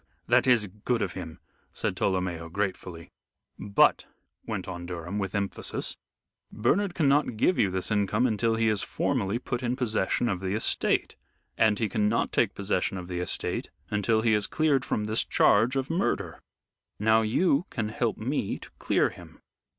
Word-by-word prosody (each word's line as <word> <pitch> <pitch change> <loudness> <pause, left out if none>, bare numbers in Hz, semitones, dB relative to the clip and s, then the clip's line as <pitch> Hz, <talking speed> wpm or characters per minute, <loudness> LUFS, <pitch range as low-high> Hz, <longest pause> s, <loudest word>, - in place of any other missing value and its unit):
That - - +4
is 120 -4 +4 0.2
good 120 -3 +1
of 90 - -3
him," 85 -3 -7 0.4
said - - -2
Tolomeo, 90 -3 -1
gratefully. 90 -3 -4 0.5
"But," 100 0 +3 0.4
went - - -3
on 85 0 -6
Durham, 90 +3 -4
with 95 0 -3
emphasis, 100 -1 -3 0.6
"Bernard 175 - +1
cannot 145 - +2
give 180 +10 +2
you 100 - +4
this 95 +2 -2
income 105 +3 +2
until 115 -1 +1
he 115 0 +1
is 105 -2 +1
formally 115 -4 -1
put 125 0 -4
in 125 0 -1
possession 120 -2 0
of 95 -5 -1
the 95 +1 -2
estate; 110 - 0 0.4
and 110 -2 +3
he 110 - 0
cannot 105 0 0
take - - +1
possession 95 - -1
of 90 0 -7
the 90 -1 -3
estate 90 - -2 0.2
until 110 +2 +2
he 115 -1 +3
is 105 -1 +1
cleared 150 -4 +2
from 105 - -1
this 110 +1 +1
charge 115 +6 +3
of 135 +3 -1
murder. 100 - -1 0.6
Now 110 +1 +4
you 140 +8 +2
can 110 -3 -3
help 115 +1 -1
me 120 -2 -2
to - - -12
clear - - +2
him." - - -14
110 Hz, 165 wpm, -27 LUFS, 95-120 Hz, 0.6 s, That